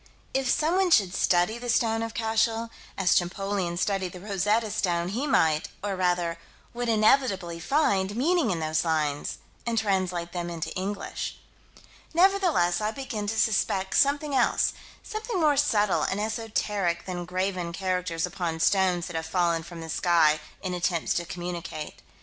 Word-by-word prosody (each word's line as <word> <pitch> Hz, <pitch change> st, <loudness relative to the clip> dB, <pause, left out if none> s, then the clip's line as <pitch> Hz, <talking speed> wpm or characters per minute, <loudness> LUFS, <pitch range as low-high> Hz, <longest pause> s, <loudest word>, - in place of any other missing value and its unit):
If 265 Hz, -1 st, 0 dB
someone 360 Hz, +7 st, +2 dB
should 195 Hz, -, +4 dB
study 180 Hz, +6 st, +2 dB
the 245 Hz, 0 st, -6 dB
stone 225 Hz, -1 st, +2 dB
of 225 Hz, 0 st, -4 dB
Cashel, 225 Hz, 0 st, 0 dB, 0.3 s
as 190 Hz, -2 st, +3 dB
Champollion 185 Hz, 0 st, -1 dB
studied 190 Hz, -1 st, -1 dB
the 180 Hz, -, -8 dB
Rosetta 210 Hz, +3 st, 0 dB
stone, 175 Hz, -4 st, 0 dB
he 245 Hz, +9 st, -2 dB
might 160 Hz, -, +2 dB, 0.2 s
or, 200 Hz, -1 st, -1 dB
rather, 175 Hz, -2 st, 0 dB, 0.3 s
would 240 Hz, 0 st, -2 dB
inevitably 215 Hz, -6 st, +2 dB
find 200 Hz, -, +1 dB
meaning 315 Hz, +2 st, +2 dB
in 175 Hz, -4 st, -1 dB
those 155 Hz, 0 st, 0 dB
lines, 155 Hz, -3 st, -1 dB, 0.3 s
and 235 Hz, -1 st, -2 dB
translate 185 Hz, -5 st, 0 dB
them 175 Hz, -1 st, -4 dB
into 170 Hz, -2 st, -4 dB
English 195 Hz, +2 st, -4 dB, 0.8 s
Nevertheless 345 Hz, -, +3 dB
I 210 Hz, -, 0 dB
begin 220 Hz, -4 st, -4 dB
to 220 Hz, +2 st, -2 dB
suspect 195 Hz, -3 st, +1 dB
something 290 Hz, +1 st, +2 dB
else: 255 Hz, -3 st, +2 dB, 0.3 s
something 435 Hz, -2 st, -4 dB
more 305 Hz, -3 st, +4 dB
subtle 210 Hz, -8 st, +2 dB
and 195 Hz, -, -1 dB
esoteric 210 Hz, -5 st, -1 dB
than 180 Hz, -2 st, -4 dB
graven 185 Hz, -1 st, -2 dB
characters 180 Hz, -2 st, -1 dB
upon 175 Hz, -3 st, -3 dB
stones 180 Hz, -1 st, +2 dB
that 175 Hz, -, -7 dB
have 160 Hz, 0 st, -3 dB
fallen 170 Hz, -1 st, +1 dB
from 170 Hz, 0 st, -9 dB
the 165 Hz, -, -7 dB
sky, 160 Hz, -3 st, +3 dB, 0.2 s
in 185 Hz, -1 st, -2 dB
attempts 175 Hz, -1 st, 0 dB
to 170 Hz, -, -1 dB
communicate. 175 Hz, -3 st, -6 dB
190 Hz, 155 wpm, -27 LUFS, 175-225 Hz, 0.8 s, should